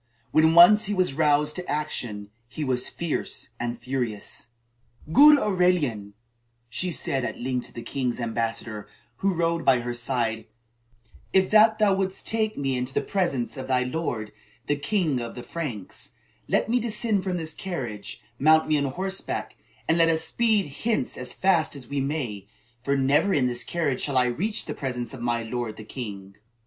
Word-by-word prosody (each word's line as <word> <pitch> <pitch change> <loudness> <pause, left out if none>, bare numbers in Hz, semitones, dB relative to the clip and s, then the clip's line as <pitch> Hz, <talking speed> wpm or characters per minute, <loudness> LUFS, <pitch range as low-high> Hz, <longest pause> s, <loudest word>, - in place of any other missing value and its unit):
When 160 +1 +4
once 210 +5 +9
he 205 +1 -1
was 185 -6 +2
roused 150 0 +2
to 180 - -6
action, 115 -9 -3 0.2
he 150 +5 -5
was 125 -2 +1
fierce 170 -4 -3
and 120 0 -3
furious. 120 -3 -4 0.7
"Good 295 - +9
Aurelian," 175 - +1 0.5
she 180 +10 -1
said 135 -5 -1
at - - -4
length 125 0 -2
to - - -18
the 115 - -7
king's 125 -3 -2
ambassador, 115 -2 -3 0.3
who 195 - +1
rode 165 0 0
by 130 -2 +4
her 120 0 -3
side: 120 -2 -2 0.9
"if 190 0 +3
that 215 +1 +6
thou 210 -2 +4
wouldst 190 0 -2
take 220 -1 -1
me 135 -2 0
into 125 +1 -4
the - - +2
presence 170 -11 -1
of 130 0 -6
thy 130 -1 +2
lord, 125 -6 -3 0.3
the 145 - +1
king 155 - 0
of 120 -1 -6
the 120 - -7
Franks, 135 - -6 0.3
let - - +1
me 240 +2 +2
descend 215 -3 -1
from 185 -1 -1
this 160 -2 -4
carriage, 125 - -5 0.2
mount 160 +3 +5
me 155 -1 +2
on 140 - 0
horseback, 190 +8 -4 0.3
and 165 +1 +3
let 165 0 +5
us 160 0 +2
speed 220 -2 +2 0.2
hence 220 - 0
as 125 - -6
fast 175 -6 +2
as 130 -4 -9
we 140 +2 -2
may, 130 -9 -3 0.3
for 140 +2 0
never 145 +9 +3
in 135 - +3
this 120 -1 -1
carriage 155 -7 -1
shall 140 -3 -1
I 125 - +5
reach 195 - -1
the - - -4
presence 125 -2 -4
of 130 - -8
my 120 -1 0
lord, 115 -1 -4
the 110 - -8
king." 100 -5 -8
140 Hz, 180 wpm, -25 LUFS, 120-180 Hz, 0.9 s, once